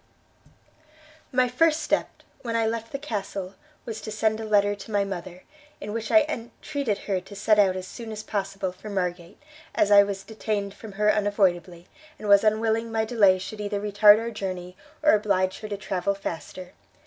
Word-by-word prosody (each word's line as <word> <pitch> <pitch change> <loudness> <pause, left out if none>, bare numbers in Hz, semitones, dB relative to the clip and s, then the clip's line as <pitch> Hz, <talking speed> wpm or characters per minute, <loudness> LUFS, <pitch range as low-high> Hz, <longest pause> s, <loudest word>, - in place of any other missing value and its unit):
"My 255 -1 +3
first 310 +6 +2
step, - - +1 0.3
when 230 -3 -3
I 225 -1 +2
left 225 0 -3
the 275 - -3
Castle, 200 -8 -5 0.3
was 225 -3 -6
to - - -7
send 215 0 0
a 225 - -4
letter 205 -1 +3
to 205 +2 -10
my 205 -1 +2
mother, 185 -2 -7 0.4
in 210 +1 -6
which 225 -1 -4
I 320 -2 +6
entreated 255 -2 -3
her 190 -3 -1
to 195 +2 -12
set 210 +1 +3
out 190 -2 +4
as 185 0 -5
soon 230 +1 -8
as 215 0 -6
possible 195 -2 -3
for 200 +4 -11
Margate, 180 -2 -3 0.4
as 205 - +2
I 200 0 +9
was 200 -1 -2
detained 210 -2 -3
from 215 -1 -11
her 210 +1 +3
unavoidably, 185 -4 0 0.3
and 210 - -7
was 200 0 +6
unwilling 220 +1 +1
my 220 0 0
delay 205 -5 +4
should 210 +3 -7
either 205 0 -2
retard 205 0 +6
our 230 +1 -3
journey, 185 -4 -5 0.3
or 305 - +6
oblige 195 -3 +1
her 215 - -6
to 205 - -3
travel 195 -1 -2
faster. 180 0 -7
205 Hz, 185 wpm, -25 LUFS, 195-220 Hz, 0.4 s, I